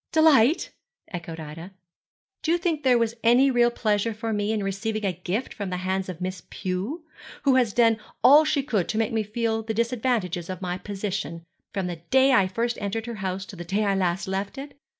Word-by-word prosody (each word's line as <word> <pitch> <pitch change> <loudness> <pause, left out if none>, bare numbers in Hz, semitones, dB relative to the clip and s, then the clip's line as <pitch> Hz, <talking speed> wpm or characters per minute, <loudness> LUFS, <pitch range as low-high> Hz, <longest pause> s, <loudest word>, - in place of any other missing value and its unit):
'Delight?' 315 -3 +4 0.4
echoed 165 -2 -6
Ida. 160 +4 -8 0.7
'Do 320 - 0
you 345 - +4
think 335 -3 -1
there 255 -3 +4
was 230 -1 +1
any 250 +4 +5
real 240 -1 +4
pleasure 215 -1 0
for 225 +1 -3
me 205 0 0
in 215 -2 -1
receiving 210 +2 -2
a 190 - +1
gift 185 +8 -3
from 200 -2 -5
the 180 - -2
hands 190 0 -1
of 175 -2 -6
Miss 185 -1 -4
Pew, 200 - -4 0.4
who 275 - +4
has 250 -4 +3
done 230 0 +4 0.3
all 285 +5 +8
she 300 -2 +1
could 215 -10 0
do - - -2
to - - -2
make 225 0 0
me 220 - +2
feel 225 +1 -1
the 220 0 -4
disadvantages 230 -7 -1
of 185 -2 -4
my 180 -1 -3
position, 195 -4 -4 0.3
from 195 -3 -2
the 175 -1 -4
day 265 +11 +3
I 195 -6 +5
first 235 +5 -2
entered 205 +2 -2
her 235 -2 -6
house 190 0 -3
to 195 - -10
the 175 - -7
day 200 +5 0
I 200 - +2
last 190 0 0
left 195 +5 -3
it? 280 +1 -8
215 Hz, 215 wpm, -25 LUFS, 185-240 Hz, 0.7 s, all